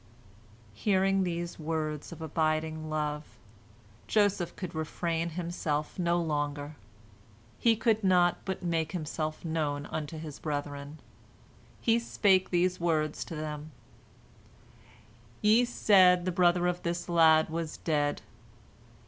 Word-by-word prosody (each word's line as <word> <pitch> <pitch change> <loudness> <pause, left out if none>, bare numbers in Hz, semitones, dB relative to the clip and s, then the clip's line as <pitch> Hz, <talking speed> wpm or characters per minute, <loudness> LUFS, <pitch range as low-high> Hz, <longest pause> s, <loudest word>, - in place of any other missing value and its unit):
Hearing 195 - +2
these 170 -1 -3
words 155 -1 -3
of 160 -1 -8
abiding 155 0 -1
love, 150 -1 -3 0.7
Joseph 205 -5 +1
could 185 -3 -6
refrain 165 +1 -2
himself 165 -2 -3
no 175 0 +2
longer. 145 -2 -2 0.8
He 230 -1 +4
could 220 -1 +1
not 180 -2 +4
but 190 -1 -4
make 165 -2 -1
himself 155 -1 -4
known 150 -3 -1
unto 155 +1 -5
his 155 -2 -8
brethren. 145 0 -4 0.8
He 230 0 +3
spake 195 -5 +2
these 180 +1 +1
words 155 -3 0
to 165 - -7
them: 150 0 -6 1.7
"Ye 220 +4 +5
said 185 -6 +5
the 185 - 0
brother 175 0 +3
of 180 0 0
this 170 0 -3
lad 160 -2 +5
was 165 -1 -4
dead. 145 -3 -1
165 Hz, 115 wpm, -29 LUFS, 155-180 Hz, 1.7 s, Ye